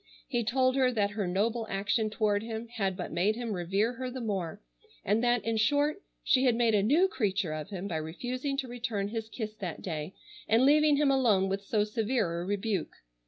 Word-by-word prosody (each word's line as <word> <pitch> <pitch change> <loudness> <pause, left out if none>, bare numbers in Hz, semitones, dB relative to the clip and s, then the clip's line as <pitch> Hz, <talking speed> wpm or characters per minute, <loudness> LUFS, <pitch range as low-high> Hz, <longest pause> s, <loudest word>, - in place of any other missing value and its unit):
He 240 -3 0
told 255 +3 +2
her 255 -1 +4
that 205 -4 0
her 205 -3 -2
noble 220 +5 0
action 205 +3 0
toward 210 -1 +1
him 225 +1 -6
had 195 -6 -2
but - - -5
made 190 +6 +1
him 235 -2 -3
revere 195 +6 0
her 255 +1 -4
the 260 +1 -6
more, 195 -8 -3 0.5
and 210 +4 +2
that, 240 -1 +2
in 225 -1 0
short, 290 - +2 0.2
she 260 0 +3
had 245 -3 +4
made 230 -1 +2
a 205 - +4
new 300 - +4
creature 200 - -1
of 155 +3 -5
him 195 -1 -5
by 170 -5 -2
refusing 250 - -3
to 270 -2 -2
return 230 -5 -3
his 225 0 -4
kiss 215 -1 -5
that 180 -6 -6
day, 160 0 -4 0.3
and 230 +4 +4
leaving 300 +1 +5
him 285 -1 +3
alone 215 -8 +3
with 195 +1 -1
so 205 +1 +1
severe 210 -5 -1
a - - -4
rebuke. 200 -2 -2
220 Hz, 210 wpm, -30 LUFS, 195-245 Hz, 0.5 s, leaving